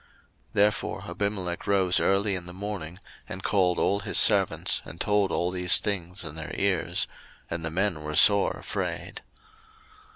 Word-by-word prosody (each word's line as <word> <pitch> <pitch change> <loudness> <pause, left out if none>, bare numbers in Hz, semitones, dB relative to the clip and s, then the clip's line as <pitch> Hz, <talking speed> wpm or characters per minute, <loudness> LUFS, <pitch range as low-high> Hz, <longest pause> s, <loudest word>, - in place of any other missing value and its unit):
01:020:008 - - -31 0.4
Therefore 105 0 0
Abimelech 95 -4 -3
rose 95 -3 +3
early 100 +1 +1
in 90 -2 -4
the 90 - -9
morning, 95 -3 -6 0.3
and 95 +1 -7
called 90 -3 +1
all 100 - +1
his 100 - 0
servants, - - +4
and 85 - -12
told 105 -2 +1
all 90 +1 -1
these 90 -1 +4
things 90 -3 -3
in 80 -3 -8
their 80 -1 -7
ears: 95 -3 0 0.4
and 85 0 -4
the 80 - -2
men 90 -1 -1
were 75 0 -5
sore 100 +4 +5
afraid. - - -5
95 Hz, 160 wpm, -26 LUFS, 85-100 Hz, 0.4 s, sore